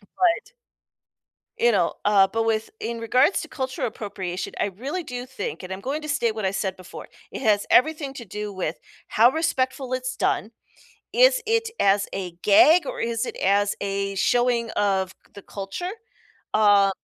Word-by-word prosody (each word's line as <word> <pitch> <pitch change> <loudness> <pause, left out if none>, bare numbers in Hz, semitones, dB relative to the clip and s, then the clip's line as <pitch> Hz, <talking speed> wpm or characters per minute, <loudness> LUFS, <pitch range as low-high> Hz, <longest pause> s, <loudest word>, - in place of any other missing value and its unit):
But 355 - 0 1.0
you 475 +1 +3
know, - - +1
uh, 200 -2 +5
but 225 0 0
with 220 -1 0
in 235 - -4
regards 250 - +3
to 330 - -7
cultural 260 -3 -3
appropriation, 190 -4 -5
I - - +2
really 270 - -4
do 250 -3 -6
think, 265 - -6
and 185 +1 -7
I'm 190 - -5
going 285 +7 -3
to 305 - -7
state 235 -6 0
what 215 -3 -4
I 190 - +1
said 190 -1 -2
before, 185 -1 -11 0.2
it - - -6
has 210 -3 +2
everything 295 -1 +3
to 235 - -8
do 210 +1 -6
with 185 -1 -3 0.3
how 235 +3 +5
respectful 265 -5 -1
it's 255 0 -2
done. 215 - 0 0.6
Is - - +5
it 455 +1 +1
as 200 0 +3
a 185 -3 -4
gag, 315 - +6
or - - -5
is 230 +1 -1
it - - -6
as 200 +1 +2
a 195 0 -2
showing 240 +1 +1
of 190 -2 0 0.2
the 200 - -9
culture, 200 - -5 0.7
uh 205 -2 +5
225 Hz, 175 wpm, -24 LUFS, 200-275 Hz, 1.0 s, gag